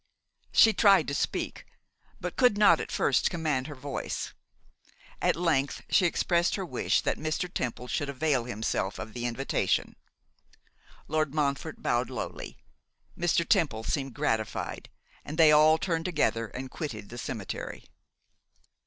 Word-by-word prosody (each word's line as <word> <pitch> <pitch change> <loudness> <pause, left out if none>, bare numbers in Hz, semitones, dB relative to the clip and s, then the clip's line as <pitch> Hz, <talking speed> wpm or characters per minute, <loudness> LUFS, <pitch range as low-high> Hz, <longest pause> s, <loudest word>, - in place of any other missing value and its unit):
She 220 - +6
tried 195 -7 +5
to - - -3
speak, - - -2 0.6
but - - -5
could 250 -5 +4
not 210 - +6
at - - -5
first - - +2
command 155 -6 -1
her 145 - -8
voice; 140 +1 -5 0.9
at - - +3
length 155 -5 0
she 185 - +5
expressed 170 +1 +1
her 195 - -3
wish - - 0
that - - -1
Mr. 155 +3 -2
Temple 125 0 -3
should 145 +3 -2
avail 140 -3 0
himself 110 -4 -2
of 110 - -7
the 120 0 -3
invitation. 130 +3 -1 1.1
Lord 155 -1 0
Montfort 145 +1 -1
bowed 120 +1 +1
lowly, 125 -4 -6 0.6
Mr. 170 -1 +1
Temple 145 - +2
seemed 135 -1 -2
gratified, 110 -1 -2 0.3
and 150 - -7
they 160 -2 +7
all 155 +1 +6
turned 165 -1 -2
together 145 -10 0
and 130 +3 -7
quitted 110 - -6
the 120 - -8
cemetery. 110 -5 -6
145 Hz, 140 wpm, -28 LUFS, 125-165 Hz, 1.1 s, they